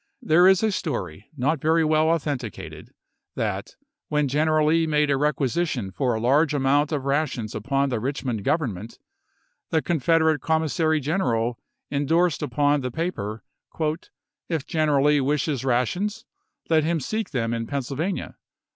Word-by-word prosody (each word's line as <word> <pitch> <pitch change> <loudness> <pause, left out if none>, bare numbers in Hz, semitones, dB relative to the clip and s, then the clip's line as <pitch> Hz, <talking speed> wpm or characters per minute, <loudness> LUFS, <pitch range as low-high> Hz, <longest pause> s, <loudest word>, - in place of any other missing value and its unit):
There 175 +4 +5
is 190 +2 +5
a 220 - +2
story, 100 - -4
not 140 +3 0
very 160 +1 +3
well 155 +1 +3
authenticated, 140 - -3 0.5
that, - - -3 0.3
when 150 -1 +1
Gen 150 +4 +1
eral 155 -1 +3
Lee 165 +1 +3
made 150 -1 +2
a - - +3
requisition 140 - -1
for 125 +4 0
a - - -2
large 145 +6 +3
amount 145 +2 +2
of 140 -3 -2
rations 140 -6 -1
upon 135 +6 0
the 120 -4 -1
Richmond 125 -3 -3
Government, 115 - -2 0.7
the 160 - +2
Con 170 -2 0
federate 160 +1 +3
Commissary 160 0 +1
General 125 -7 -1 0.3
indorsed 160 +4 +1
upon 145 -1 +1
the 125 - -3
J,.?Ijife - - -14
ofe' - - -19
paper, 110 - -3 0.7
" - - -65 0.3
If 160 -5 -2
General 150 -3 +1
Lee 150 -1 +4
wishes 145 -1 0
rations 180 - -1 0.4
let 160 -2 +3
him 165 +1 0
seek 215 - -3
l<S^p! - - -26
272. - - 0
them 115 -1 -1
in 115 -1 -3
Pennsylvania." 140 - -3
145 Hz, 165 wpm, -24 LUFS, 130-160 Hz, 0.7 s, There